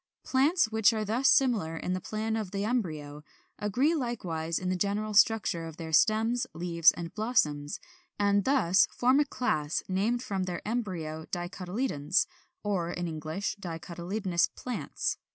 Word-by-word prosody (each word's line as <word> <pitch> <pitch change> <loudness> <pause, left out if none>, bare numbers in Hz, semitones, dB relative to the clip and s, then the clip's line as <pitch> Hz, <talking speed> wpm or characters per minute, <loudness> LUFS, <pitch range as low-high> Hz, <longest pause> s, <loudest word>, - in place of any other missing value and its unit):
Plants 275 -1 +2
which 220 0 +4
are 215 -1 -1
thus 245 +6 +2
similar 235 -12 +3
in 180 - -2
the 185 - -2
plan 220 +4 -2
of 215 -4 -3
the 200 +1 -2
embryo 155 -11 -3 0.4
agree 250 - +2
likewise 180 - -2
in 185 - -2
the 185 - +1
general 205 +3 -1
structure 205 -6 +3
of 160 -1 -10
their 160 -1 -6
stems, 225 +7 +3
leaves, 170 -1 +4
and 170 -1 -7
blossoms; 155 -11 0 0.4
and 200 0 +3
thus 190 -9 +4
form 255 +3 +2
a 295 - +3
class, 155 - -1
named 215 +6 0
from 190 -2 -2
their 180 +1 -5
embryo 175 -9 -3
DICOTYLEDONES, 180 - -1 0.4
or 190 -5 -1
in 175 0 -3
English, 160 +4 -3
DICOTYLEDONOUS 175 +1 -2
PLANTS. 250 -1 -3
195 Hz, 150 wpm, -29 LUFS, 170-225 Hz, 0.4 s, which